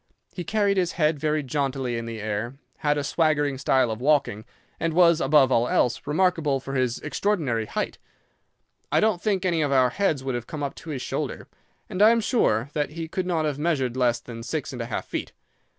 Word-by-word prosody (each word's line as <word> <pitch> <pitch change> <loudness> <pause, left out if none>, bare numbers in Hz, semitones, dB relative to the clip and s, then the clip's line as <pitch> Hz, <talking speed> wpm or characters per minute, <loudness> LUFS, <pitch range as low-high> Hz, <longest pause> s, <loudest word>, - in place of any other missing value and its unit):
He 180 - -5
carried 200 +1 +1
his 180 -2 +1
head 155 -2 +1
very 155 0 0
jauntily 135 -3 -2
in 115 0 -4
the 115 -1 -6
air, 110 +4 -3 0.2
had 150 0 +1
a 145 - -1
swaggering 145 -3 +1
style 130 -3 +2
of 110 +2 -5
walking, 135 -7 +1 0.3
and 165 -1 -1
was, 170 -2 +5
above 135 -1 +4
all 115 +1 +3
else, 120 -1 +1
remarkable 160 -3 +1
for 135 +1 -7
his 130 -3 0
extraordinary 140 - -1
height. - - -3 0.9
I - - +4
don't 215 -5 +2
think 195 -4 0
any 170 -3 +1
of 145 -2 0
our 130 -2 +4
heads 155 -6 0
would 135 -1 -2
have 120 -1 -4
come 150 -2 -5
up 140 - -2
to 165 - -10
his 140 -4 -4
shoulder, - - -4 0.4
and 185 - -3
I 215 - +8
am 230 0 +4
sure 140 - +1
that 150 -1 -1
he 165 0 -5
could 180 +2 -3
not 165 -3 0
have 145 -2 -2
measured 140 -7 0
less 120 -2 +2
than 115 -1 -9
six 145 +4 -4
and 125 - -5
a 115 - -4
half 120 - -3
feet. - - -5
145 Hz, 215 wpm, -25 LUFS, 125-170 Hz, 0.9 s, I